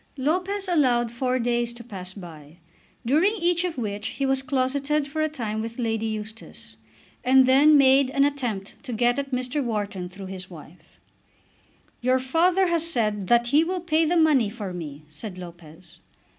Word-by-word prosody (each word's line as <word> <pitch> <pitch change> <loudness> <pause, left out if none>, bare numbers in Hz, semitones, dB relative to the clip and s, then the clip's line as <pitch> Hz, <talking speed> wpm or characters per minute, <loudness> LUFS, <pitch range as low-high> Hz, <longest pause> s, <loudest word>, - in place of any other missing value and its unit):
Lopez 370 +8 -1
allowed 250 -9 +2
four 255 +1 -1
days 240 -1 0
to 235 0 -10
pass 190 -5 -8
by, 160 -5 -12 0.5
during 325 - +3
each 345 -2 +1
of 350 -4 -3
which 210 -2 -3
he 275 - -3
was 270 0 +1
closeted 275 +2 0
for 310 +2 -3
a 310 - +1
time 220 -7 -4
with 230 +1 -6
Lady 225 -2 -1
Eustace, 215 +1 -8 0.5
and 260 +1 +5
then 285 +4 +6
made 270 -1 +5
an 275 +1 +2
attempt 245 -9 -3
to 255 -4 -6
get 240 +4 +1
at 275 -1 -4
Mr. 255 +2 -2
Wharton 205 -6 -3
through 195 +1 -10
his 185 -1 -8
wife. 165 -1 -15 1.0
"Your 255 +1 +3
father 340 +8 +2
has 340 -2 +1
said 215 - 0
that 240 +2 +3
he 295 +5 +4
will 365 +2 -2
pay 330 -2 +1
the 340 +2 +1
money 295 -9 +4
for 205 -4 -6
me," 155 -4 -7
said 180 +6 -8
Lopez. 170 -1 -13
245 Hz, 170 wpm, -24 LUFS, 205-290 Hz, 1.0 s, then